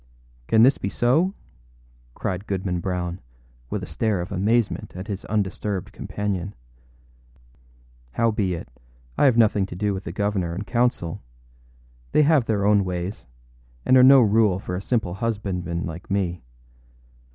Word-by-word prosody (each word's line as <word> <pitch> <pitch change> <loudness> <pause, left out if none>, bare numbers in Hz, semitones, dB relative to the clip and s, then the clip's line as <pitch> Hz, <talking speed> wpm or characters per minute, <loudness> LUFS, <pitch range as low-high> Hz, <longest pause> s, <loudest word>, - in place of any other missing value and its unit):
â - - +2
âCan 110 - +8
this 130 +3 +5
be 100 - -2
so?â 135 - +2 0.8
cried 95 +2 -4
Goodman 95 -2 -2
Brown, 90 0 -3 0.5
with - - -3
a - - -3
stare 110 -4 -1
of 85 - -5
amazement 105 +4 0
at 95 +1 -6
his 100 -3 -5
undisturbed 100 -1 -2
companion. 100 -2 -4 1.6
âHowbeit, 105 -7 0 0.5
I - - +3
have 130 -4 +4
nothing 105 -4 +3
to 85 - -8
do 100 +2 0
with 95 0 -6
the - - -4
governor 95 -3 -1
and 100 +4 -5
council; 120 -9 0 0.9
they 150 - +5
have 150 -4 +4
their 105 -3 0
own 100 -1 +4
ways, 90 - -4 0.6
and 130 - +5
are 130 - +8
no 135 +1 +8
rule 105 -3 +3
for 90 -2 -5
a 90 - -3
simple 110 -5 -1
husbandman 95 -5 -3
like 85 +1 -8
me. 95 -3 -1
100 Hz, 150 wpm, -24 LUFS, 90-110 Hz, 1.6 s, âCan